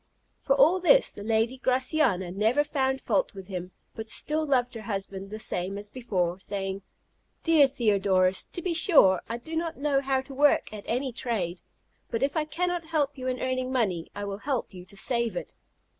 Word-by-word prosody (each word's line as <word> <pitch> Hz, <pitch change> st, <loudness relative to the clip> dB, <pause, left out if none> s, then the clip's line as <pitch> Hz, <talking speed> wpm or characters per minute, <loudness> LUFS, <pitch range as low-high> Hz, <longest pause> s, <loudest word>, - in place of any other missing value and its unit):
For 275 Hz, -, +2 dB
all 310 Hz, +7 st, +5 dB
this -, -, +5 dB
the -, -, -9 dB
lady 225 Hz, +4 st, 0 dB
Graciana 255 Hz, -, +1 dB
never 220 Hz, +9 st, +2 dB
found 265 Hz, -2 st, -1 dB
fault 205 Hz, -2 st, 0 dB
with 190 Hz, 0 st, -10 dB
him, 180 Hz, -1 st, -5 dB, 0.2 s
but 220 Hz, 0 st, -7 dB
still 305 Hz, +6 st, +1 dB
loved 250 Hz, -3 st, +1 dB
her 225 Hz, -, -7 dB
husband 195 Hz, -2 st, -4 dB
the 215 Hz, -, -6 dB
same 195 Hz, -2 st, -2 dB
as 205 Hz, 0 st, -7 dB
before; 185 Hz, -8 st, -2 dB
saying, 195 Hz, 0 st, -3 dB, 0.6 s
"Dear 320 Hz, -4 st, +6 dB
Theodorus, 195 Hz, -7 st, +2 dB
to 350 Hz, -, -8 dB
be 360 Hz, -, 0 dB
sure 295 Hz, -, +5 dB
I 230 Hz, -, -2 dB
do 315 Hz, +7 st, -8 dB
not 330 Hz, 0 st, -2 dB
know 280 Hz, -1 st, +1 dB
how 265 Hz, -1 st, 0 dB
to 270 Hz, +1 st, -11 dB
work 285 Hz, -4 st, +3 dB
at 210 Hz, -1 st, -8 dB
any 255 Hz, +3 st, -1 dB
trade; 190 Hz, -8 st, -3 dB, 0.5 s
but 230 Hz, +2 st, -1 dB
if 280 Hz, +1 st, 0 dB
I 310 Hz, -1 st, +1 dB
can 350 Hz, +4 st, -2 dB
not 350 Hz, -2 st, -3 dB
help 300 Hz, -3 st, 0 dB
you 255 Hz, -2 st, -6 dB
in 255 Hz, 0 st, -1 dB
earning 255 Hz, 0 st, -1 dB
money, 195 Hz, -10 st, 0 dB
I 205 Hz, -, -4 dB
will 200 Hz, 0 st, -5 dB
help 260 Hz, -5 st, -2 dB
you 180 Hz, -1 st, -10 dB
to 200 Hz, +2 st, -12 dB
save 235 Hz, +2 st, 0 dB
it." -, -, -5 dB
245 Hz, 200 wpm, -27 LUFS, 200-280 Hz, 0.6 s, Dear